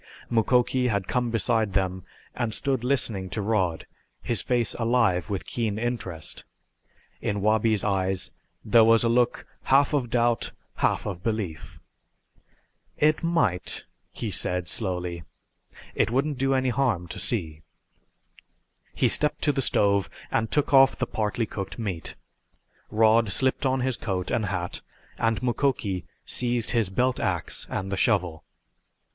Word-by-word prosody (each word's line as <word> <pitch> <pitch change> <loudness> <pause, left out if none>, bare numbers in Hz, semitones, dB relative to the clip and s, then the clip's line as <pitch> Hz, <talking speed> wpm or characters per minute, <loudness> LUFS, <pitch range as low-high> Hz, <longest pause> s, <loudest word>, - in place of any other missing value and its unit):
Mukoki 125 +2 +2
had 100 -5 -1
come 125 -1 0
beside 110 -1 0
them 95 -1 -1 0.3
and 115 -4 -1
stood 135 -4 -1
listening 110 -7 -1
to 110 - -4
Rod, 95 -7 0 0.4
his 115 -6 +1
face 120 -3 +1
alive 115 -6 +2
with 100 -2 -3
keen 110 -4 -2
interest. 110 -9 -4 0.8
In 100 0 -1
Wabi's 110 0 +2
eyes 95 -2 0 0.3
there 115 +2 +6
was 115 +1 +5
a 115 - +2
look 120 +1 +1 0.2
half 140 +2 +4
of 130 -5 0
doubt, 120 -1 +1 0.2
half - - +1
of 90 -4 -4
belief. 105 -8 -4 1.2
"It 155 +1 +3
might," 165 - 0 0.3
he - - -4
said 90 -1 0
slowly. 90 -4 -2 0.7
"It - - +1
wouldn't 135 +3 0
do 135 0 +2
any 130 -1 +1
harm 120 -9 0
to - - -6
see." 80 -9 -1 1.3
He - - +3
stepped 150 - +3
to 150 - +4
the 135 -1 -1
stove 100 -5 +2 0.2
and 115 -1 0
took 145 -1 0
off 135 0 +7
the 130 - -1
partly 110 0 -1
cooked 95 -2 -6
steak. 95 -8 -4 0.7
Rod 110 0 +3
slipped 130 +5 +1
on 130 0 0
his 130 -1 0
coat 95 -4 -3
and 110 -3 0
hat 90 -2 -3 0.4
and 115 +1 0
Mukoki 120 - 0 0.2
seized 120 -2 0
his 115 -5 +2
belt 125 +6 0
ax - - -1
and 95 0 -3
the 95 - -1
shovel. 90 -8 +1
110 Hz, 140 wpm, -26 LUFS, 95-125 Hz, 1.3 s, off